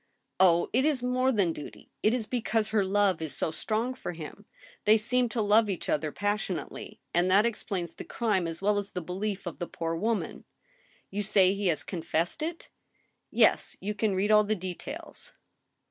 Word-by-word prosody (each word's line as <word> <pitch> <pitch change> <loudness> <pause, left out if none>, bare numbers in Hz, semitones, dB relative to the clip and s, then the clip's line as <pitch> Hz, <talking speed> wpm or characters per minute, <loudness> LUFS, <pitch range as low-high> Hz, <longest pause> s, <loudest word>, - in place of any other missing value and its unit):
" - - -51
Oh! 175 -2 +5
it 255 +3 +3
is 285 -4 +1
more 255 +1 +2
than 195 -8 +2
duty.... 150 - -10
it 215 - +4
is 240 -2 +1
because 225 -2 0
her 215 -2 +2
love 195 -3 +2
is 160 -2 -4
so - - -1
strong 225 +8 -1
for 255 - -6
him. 170 +5 -9 0.4
They 215 +1 +7
seem 245 +3 +1
to 225 0 -1
love 210 +1 +4
each 190 - -3
other 155 0 0
passionately; 205 -3 -3
and 175 +2 +3
that 200 +4 +5
explains 190 -7 -2
the - - -8
crime 205 -7 0
as 165 +3 -6
well 205 0 +3
as 200 0 -7
the 180 - -3
belief 195 +3 -3
of 175 - -6
the 175 - -3
poor 165 0 -3
wofnan.... 220 +5 -2 0.7
You 205 +2 -2
say 195 -2 +4
he 200 -1 -1
has 165 -3 +1
confessed 170 - -2
it? 330 +2 -4 0.3
" - - -41 0.2
"Yes, - - +3
you 210 +2 -3
can 210 -2 0
read 200 +3 +1
all 210 0 +7
the 215 +1 0
details." 185 - -7
205 Hz, 195 wpm, -29 LUFS, 180-220 Hz, 0.7 s, They